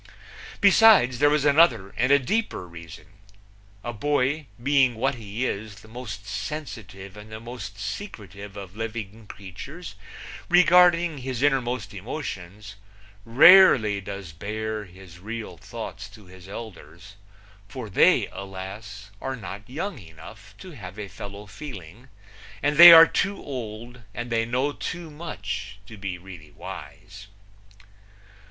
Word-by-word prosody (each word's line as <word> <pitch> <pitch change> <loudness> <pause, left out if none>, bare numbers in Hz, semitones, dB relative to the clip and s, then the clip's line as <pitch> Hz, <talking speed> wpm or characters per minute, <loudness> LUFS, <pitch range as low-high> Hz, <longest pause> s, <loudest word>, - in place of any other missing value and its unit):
Besides 200 - +6
there 145 +1 +5
was 150 -1 +1
another 135 - +4
and 130 +4 +1
a 140 - +7
deeper 140 - -2
reason. 85 -3 -12 0.8
A 120 - -4
boy, 145 +4 0 0.2
being 135 -3 +3
what 110 - 0
he 110 +1 -5
is, 110 -2 -4
the 110 - -16
most 110 -4 -8
sensitive 100 -5 -7
and 105 +1 -12
the 110 - -7
most 115 -4 -8
secretive 105 - -8
of 95 -1 -9
living 110 -1 -6
creatures 130 - -9 0.6
regarding 175 -2 +5
his 130 0 -4
innermost 125 -7 0
emotions, 100 - -7 0.5
rarely 115 - +7
does 100 -3 -8
bare 110 +5 -5
his 90 -2 -15
real 110 +3 -7
thoughts - - -8
to 105 - -16
his 90 0 -14
elders, 95 -3 -10 0.5
for 125 +1 -7
they, 100 - +4
alas, 100 +2 -9
are 135 0 -3
not 105 -1 -9
young 165 +4 -5
enough 95 +3 -14
to 185 - -11
have 100 - -10
a 105 -2 -6
fellow 100 +2 -9
feeling, 110 - -10 0.5
and 145 0 +1
they 170 +1 +13
are 165 0 +11
too 200 +4 -1
old 120 -2 -8
and 120 0 -5
they 115 -1 +1
know 130 +5 0
too 170 0 -6
much 110 -10 -6
to 110 - -11
be 95 -3 -5
really 85 -4 -12
wise. 100 +6 -11
110 Hz, 135 wpm, -25 LUFS, 100-135 Hz, 0.8 s, they